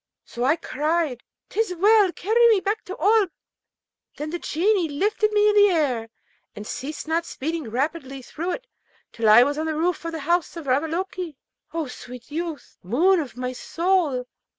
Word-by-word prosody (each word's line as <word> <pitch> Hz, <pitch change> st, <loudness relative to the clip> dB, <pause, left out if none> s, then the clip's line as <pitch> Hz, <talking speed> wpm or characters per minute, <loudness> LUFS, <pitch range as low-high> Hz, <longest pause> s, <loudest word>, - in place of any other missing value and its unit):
So 240 Hz, -, -5 dB
I 280 Hz, +5 st, +4 dB
cried, 305 Hz, -4 st, -1 dB, 0.3 s
''Tis 435 Hz, -4 st, -1 dB
well! 410 Hz, 0 st, +5 dB
carry 465 Hz, +6 st, +3 dB
me 435 Hz, -3 st, +5 dB
back 410 Hz, +3 st, -2 dB
to 375 Hz, -, -7 dB
Oolb.' 410 Hz, +2 st, +4 dB, 0.9 s
Then 300 Hz, +1 st, -4 dB
the 345 Hz, -, -3 dB
Genie 360 Hz, +1 st, +1 dB
lifted 420 Hz, +8 st, +1 dB
me 420 Hz, 0 st, +4 dB
into 420 Hz, 0 st, +5 dB
the 410 Hz, -, +7 dB
air, 265 Hz, -10 st, 0 dB, 0.5 s
and 210 Hz, -, -8 dB
ceased 290 Hz, +8 st, -6 dB
not 330 Hz, +1 st, +1 dB
speeding 320 Hz, -4 st, -4 dB
rapidly 270 Hz, +1 st, -3 dB
through 345 Hz, +8 st, -4 dB
it, -, -, -6 dB, 0.5 s
till 225 Hz, -2 st, +1 dB
I 220 Hz, +3 st, +9 dB
was 290 Hz, +3 st, -1 dB
on 320 Hz, -, -1 dB
the 315 Hz, -, -1 dB
roof 345 Hz, +2 st, 0 dB
of 335 Hz, -, -3 dB
the 320 Hz, -, -4 dB
house 340 Hz, +3 st, 0 dB
of 325 Hz, -, -7 dB
Ravaloke. 330 Hz, +5 st, -1 dB, 0.4 s
O 325 Hz, -1 st, -2 dB
sweet 250 Hz, 0 st, -10 dB
youth! 325 Hz, -1 st, -5 dB
moon 335 Hz, -, +3 dB
of 275 Hz, -6 st, -6 dB
my 250 Hz, 0 st, -3 dB
soul! 330 Hz, -4 st, 0 dB
325 Hz, 175 wpm, -24 LUFS, 275-375 Hz, 0.9 s, I